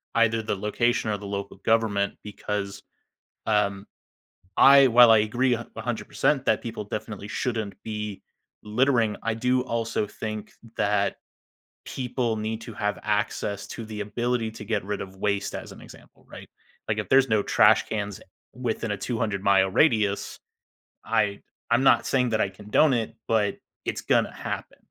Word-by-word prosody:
either 115 -1 +3
the 105 - -2
location 110 +3 0
or 105 - -1
the 100 - -10
local 100 0 -5
government, 105 -3 +1
because, 100 -1 -4 0.7
um, 100 -2 +1 0.7
I, 140 0 +8
while 120 0 +7
I 110 - +7
agree 120 +4 +1
a 120 0 -5
a - - -4
100% 130 +3 0
that 110 - +3
people 115 -2 -5
definitely 105 0 -6
shouldn't 110 -2 -2
be 105 -2 -5 0.4
littering, 115 0 +2
I 115 - -1
do 125 +3 +1
also 115 -3 -2
think 110 0 -6 0.2
that 100 -1 +1 0.7
people 125 -3 -2
need 110 +1 -3
to 115 - -8
have 105 0 -2
access 105 -1 -1
to 115 - -7
the 110 -1 -6
ability 120 +1 -1
to 110 - -9
get 110 -3 -1
rid 105 0 -3
of 95 0 -8
waste 100 0 -1
as - - -7
an - - -12
example, - - -16
right? - - -11 0.4
Like - - 0
if - - -5
there's 135 -1 +5
no 110 -2 +3
trash 110 +1 +4
cans 105 -3 -4 0.3
within 115 -2 -3
a 105 - -2
200-mile 100 -4 +1
radius, 105 -3 +1 0.7
I 100 -1 0 0.3
I'm 120 +3 +4
not 125 -3 +5
saying 125 -2 +1
that 110 -1 +1
I 100 - +1
condone 105 +9 +2
it, 115 -2 -2
but 110 -2 +1 0.3
it's - - -2
gonna - - +2
happen. - - -6
110 Hz, 160 wpm, -25 LUFS, 105-120 Hz, 0.7 s, I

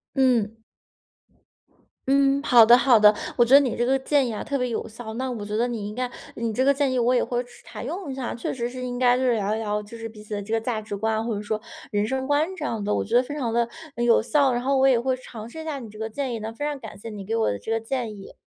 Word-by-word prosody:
嗯。 240 -5 +2 1.5
嗯， 275 0 +4
好 245 -5 +7
的 235 +2 +8
好 250 -3 +5
的， 210 0 +8 0.2
我 240 - +5
觉 245 +3 +6
得 - - +10
你 265 -5 0
这 240 - 0
个 265 +2 +2
建 270 0 +1
议 - - -3
啊， 215 - -4
特 280 -1 -2
别 250 0 0
有 230 - -3
效， 225 0 -8
那 260 +2 -2
我 225 -4 -5
觉 210 +1 -3
得 235 +2 +2
你 220 -4 -4
应 210 - -8
该 250 0 -2 0.3
你 230 -1 -2
这 255 - +1
个 275 - +5
建 280 -1 +1
议 255 - +1
我 245 +1 +3
也 - - +3
会 245 -1 -1
去 245 - -19
试 - - -17
采 - - -8
用 355 -5 -5
一 - - -4
下。 260 -2 -4
确 235 - -3
实 240 -2 -3
是 255 +1 -8
应 245 0 -4
该 250 -1 +4
就 260 - -1
是 250 -2 +3
聊 210 -1 0
一 - - -3
聊 210 -1 -2
就 210 +3 -11
是 225 0 -6
彼 215 -1 -12
此 215 0 -5
的 205 - -3
这 220 +3 -5
个 225 - +1
价 225 -1 -2
值 215 -1 -6
观， 220 +2 -1
或 235 - -1
者 205 - -4
说 215 +1 -2 0.3
人 205 0 0
生 265 +3 -2
观 290 +2 +2
这 - - -7
样 220 -3 -2
的。 210 +1 0
我 - - 0
觉 225 - -2
得 245 - +6
非 290 - -7
常 250 -6 -2
地， 235 0 +1 0.3
嗯， 240 - -1
有 235 - +5
效， 270 +2 +2
然 240 - -1
后 270 +2 +1
我 265 0 +5
也 255 -3 +4
会 260 +2 0
尝 230 -3 -9
试 320 - -9
一 - - -11
下 300 -3 -3
你 235 -4 -9
这 215 - -13
个 220 0 -3
建 260 +4 -3
议 - - -4
的， 220 +1 -5
非 260 - -6
常 295 -1 -2
感 220 -4 -9
谢 205 +3 -9
你 205 -3 -8
给 225 +3 -2
我 225 - +2
的 100 - -2
这 220 - -6
个 225 - +1
建 225 -1 -3
议。 195 - -12
235 Hz, 340 characters per minute, -24 LUFS, 220-260 Hz, 1.5 s, 得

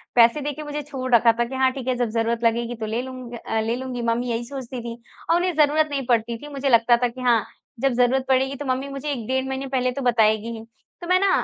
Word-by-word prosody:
पैसे 235 +5 +5
देके 295 +1 -4
मुझे 295 0 -4
छोड़ 260 -3 -5
रखा 230 0 +6
था 235 - +3
कि 265 +2 -7
हाँ, 260 0 +3
ठीक 260 -1 -7
है 255 - +1
जब 240 -2 0
ज़रूरत 230 +1 -1
लगेगी 235 +1 +1
तो 220 -1 -5
ले 225 +3 -2
लूँग 255 -2 -8
अ, 225 -1 -3
ले 225 +2 -1
लूँगी 255 -1 -5
मम्मी 235 +1 0
यही 230 +1 -2
सोचती 255 -2 -6
थीं। 235 0 -6 0.3
और 335 - +5
उन्हें 360 0 +1
ज़रूरत 305 +1 +3
नहीं 275 -3 -2
पड़ती 235 -1 +1
थी 295 - -10
मुझे 275 0 -1
लगता 235 0 +5
था - - +4
कि 255 +2 -9
हाँ 235 -4 +3 0.4
जब 270 -1 +2
ज़रूरत 250 +2 +2
पड़ेगी 265 +1 +2
तो 290 - -6
मम्मी 260 +1 -1
मुझे 275 +2 -4
1 240 -5 -4
डेढ़ 260 0 0
महीने 265 +1 -3
पहले 255 -1 0
तो 275 - -5
बताएगी 225 -2 +2
ही। 220 - -9 0.4
तो 345 - -6
मैं 365 0 +4
ना 395 0 +3
255 Hz, 260 wpm, -23 LUFS, 235-275 Hz, 0.4 s, रखा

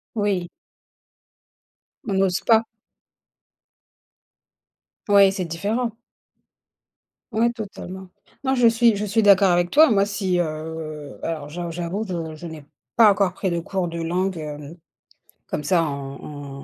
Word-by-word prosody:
Oui. 200 -5 0 1.6
On 200 - -1
n'ose 190 -1 +1
pas. 225 -1 +4 2.4
Ouais, 200 -1 +6
c'est 190 -2 -3
différent. 210 +8 -2 1.4
Ouais, 230 +2 +2
totalement. 190 -4 -8 0.4
Non, 265 0 +1
je 245 -2 +5
suis 230 -1 +4
je 210 +1 -2
suis 215 +3 +1
d'accord 200 -2 +6
avec 175 0 +1
toi. 315 +2 +7
Moi, 200 -2 +3
si, 195 -3 -1
heu, 155 -2 -5
alors 155 -3 -4
j'a 175 +2 -5
j'avoue, 175 +6 -3
je 165 -4 -4
je 170 +3 -8
n'ai 160 -3 -10 0.3
pas 220 -3 +7
encore 195 -2 +1
pris 190 0 -2
de 170 - 0
cours 180 +1 -2
de 170 0 -5
langue, 180 +2 -1
hem, 150 0 -7 0.7
comme 150 - -3
ça 170 +1 +2
en 140 -1 -7
180 Hz, 135 wpm, -23 LUFS, 160-205 Hz, 2.4 s, toi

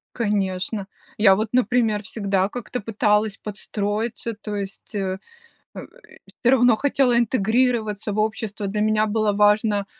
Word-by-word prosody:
Конечно. 200 -2 -1 0.3
Я 200 -3 +6
вот, 215 +2 -1
например, 235 -3 +2
всегда 200 -2 -1
как-то 245 +2 -5
пыталась 210 0 +1
подстроиться, 210 +2 -4
то 210 0 -6
есть, 195 +1 -7
э, 190 -2 -2 0.6
э, - - -6 0.6
всё 245 - +5
равно 245 -3 +5
хотела 265 -1 +2
интегрироваться 225 -2 +1
в 215 - -2
общество. 215 -1 -2
Для 210 +2 -2
меня 215 0 +2
было 215 0 +1
важно 210 0 +3
215 Hz, 130 wpm, -22 LUFS, 205-230 Hz, 0.6 s, Я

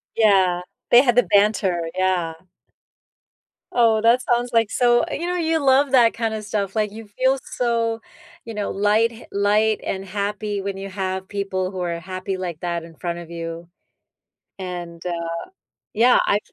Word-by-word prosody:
Yeah, 190 -5 +4 0.3
they 240 - +8
had 245 -4 +2
the 245 - +5
banter. 200 -5 +2
Yeah. 185 -3 +1 1.4
Oh, 225 -2 +4
that 235 +3 +4
sounds 240 0 0
like 230 -3 +3
so 240 +1 +3
You 340 - -3
know, 360 0 -1
you 325 -1 +1
love 270 +1 +4
that 240 -4 +5
kind 225 -1 -2
of 215 -1 -4
stuff, 200 -1 -3
like, 210 -2 0
you 225 +1 -9
feel 260 +6 +1 0.2
so, 230 -2 0 0.4
you 230 - -8
know, 210 -1 -3
light 210 +4 +2
ha 230 - -12
light 210 +2 +2
and 190 0 -3
happy 205 +1 -3
when 195 0 -4
you 195 +1 -6
have 190 -1 -4
people 190 -2 -2
who 190 - -6
are 170 -2 -2
happy 185 +1 -4
like 175 -4 -5
that 170 -1 -3
in 165 0 -13
front 170 +1 -4
of 170 -1 -10
you, 165 0 -6 0.9
and, 175 -2 -6
uh 170 -1 -3 0.7
Yeah 240 +3 +5
I've 205 - +2
205 Hz, 170 wpm, -22 LUFS, 185-230 Hz, 1.4 s, they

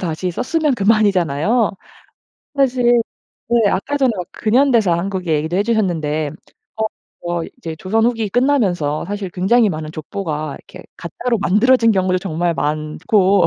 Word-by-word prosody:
다시 175 +1 -3
썼으면 295 - 0
그만이잖아요. 205 - +2 0.9
사실 245 -3 +3 0.5
네 235 -3 +3
아까 280 +10 -1
전에 265 -4 +2
막 180 -2 -4
근현대사 235 -4 +2
한국 185 +1 -3
얘기도 160 +2 0
해 200 - +2
주셨는데 165 -9 0 0.5
어 220 - 0 0.4
뭐 175 -1 -1
이제 165 -1 -6
조선 215 +7 0
후기 230 -3 0
끝나면서 195 - +1
사실 200 -1 -4
굉장히 205 +5 +2
많은 155 -2 -5
족보가 155 -2 -5
이렇게 - - -14
가짜로 235 +7 -3
만들어진 230 +5 +3
경우도 185 -3 +1
정말 175 -1 -1
많고 155 +6 +1
195 Hz, 320 characters per minute, -18 LUFS, 170-230 Hz, 0.9 s, 사실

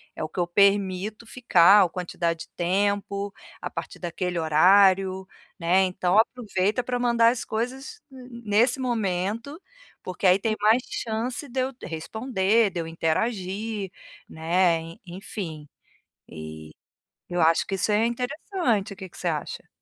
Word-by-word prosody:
é - - -5
o 155 - -4
que - - -6
eu 175 - +1
permito 200 +3 +1
ficar 205 -5 +5
ou 180 - 0
quantidade 170 -1 -3
de - - -38
tempo, 200 +2 0 0.3
a - - -4
partir - - -7
daquele 175 0 -3
horário, 190 +4 +4 0.3
né, 175 +2 +3
então, 185 +1 0
aproveita 220 -1 +1
para 250 0 -2
mandar 235 -1 +4
as 245 - -4
coisas 260 - -4
ne 250 -2 -11
nesse 235 +6 +2
momento, 230 - -2 0.4
porque, 185 +2 -5
aí, 185 +1 +5
tem 215 +1 0
mais 220 +4 +4
chance 235 +5 -3
de 260 +2 -3
eu 260 +1 -2
responder, 210 +4 0
de 175 - -4
eu 165 - -6
interagir", 195 +4 -2 0.4
né, 170 +1 +1
e 165 +1 -11
enfim, 175 -4 -7 0.6
eh, 80 -1 -9 0.6
eu 175 0 -1
acho 165 +1 +3
que 195 - -2
isso 195 +3 0
é 210 +2 +3
interessante, 245 - -2
que 190 -1 -9
que - - -16
você - - -3
acha? - - -5
200 Hz, 150 wpm, -25 LUFS, 180-230 Hz, 0.6 s, ficar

